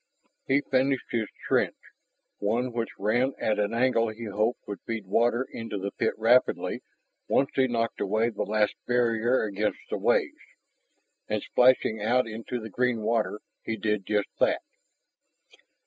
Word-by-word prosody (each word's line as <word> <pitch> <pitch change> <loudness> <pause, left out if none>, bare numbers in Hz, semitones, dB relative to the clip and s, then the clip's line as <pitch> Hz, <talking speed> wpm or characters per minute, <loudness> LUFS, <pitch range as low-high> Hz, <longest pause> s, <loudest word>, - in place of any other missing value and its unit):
He 135 +2 +3
finished 135 -1 0
his 115 -3 0 0.2
trench, - - +1 0.6
one 120 +4 0
which 115 -1 -3
ran 120 +7 +1
at 105 -1 0
an 105 0 +1
angle 115 -1 +2
he 110 +2 -7
hoped 110 +4 -1
would 100 -1 -5
feed 115 -3 -3
water 120 +6 +2
into 115 -2 -5
the 100 +1 -3
pit 110 - -1
rapidly 120 +3 +2 0.5
once 135 - +2
he 130 -1 +3
knocked 115 -1 -1
away 110 +4 +1
the 110 - -5
last 105 0 +1
barrier 120 0 +2
against 105 0 -1
the - - -1
waves. 360 -11 +1 0.9
And, - - -1
splashing 125 -3 +3
out 125 +4 +2
into 115 +2 -5
the 110 -1 -8
green 125 0 0
water, 110 -1 0 0.2
he 115 - -3
did 105 -2 -1
just 105 -1 0
that. - - +2
115 Hz, 150 wpm, -27 LUFS, 105-125 Hz, 0.9 s, He